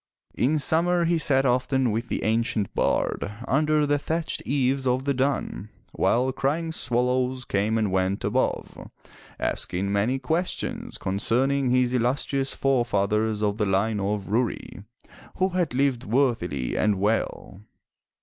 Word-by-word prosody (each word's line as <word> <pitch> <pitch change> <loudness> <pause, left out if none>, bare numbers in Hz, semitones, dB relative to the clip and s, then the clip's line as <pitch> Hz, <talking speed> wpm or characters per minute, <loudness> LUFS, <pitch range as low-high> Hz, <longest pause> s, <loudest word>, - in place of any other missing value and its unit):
In 140 +6 +1
summer 170 +4 +2
he 170 0 +2
sat 135 -3 +3
often 130 0 +1
with 115 +3 -3
the - - -2
ancient 110 -2 0
bard 100 - 0 0.2
under 150 +2 +2
the 145 0 +1
thatched 160 +3 -3
eaves 135 0 +1
of 130 +1 +1
the 140 - +1
dun, 130 -5 -2 0.2
while 125 +3 +1
crying 150 +5 -1
swallows 125 -1 -1
came 105 +3 0
and 105 -3 0
went 95 +1 0
above, 120 +6 -2 0.5
asking 95 +3 -2
many 105 +6 +1
questions 160 +7 -3
concerning 125 +8 0
his 125 0 +2
illustrious 135 +2 0
forefathers 110 -4 +1
of 105 0 0
the 105 - +1
line 100 +3 +1
of 100 0 -2
Rury, 115 -3 -2 0.3
— - - -20
who 185 +1 +2
had 175 -7 -1
lived 135 -2 +1
worthily 110 - 0
and 105 -1 +2
well? 105 -2 -2
125 Hz, 140 wpm, -25 LUFS, 105-140 Hz, 0.5 s, sat